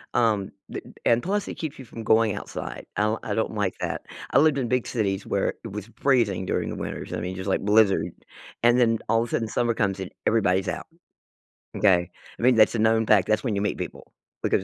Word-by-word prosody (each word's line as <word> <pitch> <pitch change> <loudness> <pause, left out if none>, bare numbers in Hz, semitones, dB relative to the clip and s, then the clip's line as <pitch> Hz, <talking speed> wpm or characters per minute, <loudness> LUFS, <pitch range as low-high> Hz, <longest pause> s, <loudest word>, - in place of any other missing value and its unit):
um, 110 -5 +2 0.2
th - - -5
and - - -15
and 120 0 +3
plus 200 +1 -1
it - - -5
keeps 155 -3 -5
you 130 - -9
from 115 0 -8
going 110 -1 +3
outside, - - -6
I'll 110 +2 +1
I 105 - -2
don't 110 - -1
like 100 -3 -1
that. - - -3 0.3
I 135 - +5
lived 155 -2 +4
in 125 -3 -1
big 125 -1 +1
cities 100 -4 -1
where 100 - 0
it 115 - -7
was 105 +2 -6
freezing 115 -9 +2
during - - -1
the - - -4
winters, - - -5
I 90 - -2
mean, 90 +2 -4
just 95 +1 -4
like - - +1
blizzard, 105 -1 +4 0.6
and 120 +1 +5
then 115 -2 +4
all 115 0 +4
of 120 - -6
a - - -12
sudden, 115 - 0
summer 120 -1 +1
comes 100 -4 0
in, 95 - -5 0.2
everybody's 95 -4 +2
out, - - -4 0.9
okay? 90 -4 +3 0.3
I - - -6
mean, 125 0 +5
that's 110 +1 +5
a - - 0
known 110 0 +3
fact 100 -4 +4
that's 110 +3 +1
when 110 -5 -1
you 100 - 0
meet 105 - -1
people, - - -7 0.3
because 95 - +2
110 Hz, 235 wpm, -25 LUFS, 100-120 Hz, 0.9 s, I